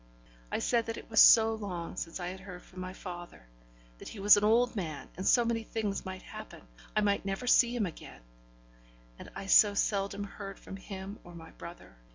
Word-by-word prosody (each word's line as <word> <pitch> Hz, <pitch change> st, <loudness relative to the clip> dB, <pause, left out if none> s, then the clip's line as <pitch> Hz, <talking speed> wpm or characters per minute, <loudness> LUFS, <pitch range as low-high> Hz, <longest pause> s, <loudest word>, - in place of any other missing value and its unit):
I -, -, 0 dB
said 235 Hz, -2 st, 0 dB
that 225 Hz, -, -4 dB
it -, -, -11 dB
was 220 Hz, -, +4 dB
so 225 Hz, -1 st, +7 dB
long 185 Hz, -7 st, -5 dB
since 170 Hz, 0 st, -5 dB
I 175 Hz, 0 st, -4 dB
had 190 Hz, +1 st, -8 dB
heard 185 Hz, -2 st, -10 dB
from 185 Hz, -, -13 dB
my 185 Hz, 0 st, -5 dB
father; 175 Hz, -, -9 dB, 0.5 s
that -, -, -10 dB
he 215 Hz, -, -10 dB
was 205 Hz, +1 st, +8 dB
an 205 Hz, -, 0 dB
old 235 Hz, +3 st, +3 dB
man, 160 Hz, -7 st, -5 dB
and 185 Hz, -, -4 dB
so 240 Hz, -2 st, +5 dB
many 230 Hz, -1 st, 0 dB
things 215 Hz, -3 st, -4 dB
might 185 Hz, 0 st, -7 dB
happen -, -, -10 dB, 0.3 s
I 215 Hz, -, +3 dB
might 200 Hz, -1 st, +1 dB
never 195 Hz, +5 st, -4 dB
see 245 Hz, 0 st, +4 dB
him 225 Hz, -4 st, 0 dB
again 165 Hz, -, -10 dB, 1.0 s
and -, -, -10 dB
I 195 Hz, -, -6 dB
so 205 Hz, +1 st, +6 dB
seldom 200 Hz, 0 st, -1 dB
heard 200 Hz, -1 st, -8 dB
from -, -, -10 dB
him 195 Hz, +1 st, -8 dB
or 175 Hz, 0 st, -13 dB
my 165 Hz, -1 st, -11 dB
brother. 170 Hz, -, -12 dB
195 Hz, 205 wpm, -30 LUFS, 185-220 Hz, 1.0 s, was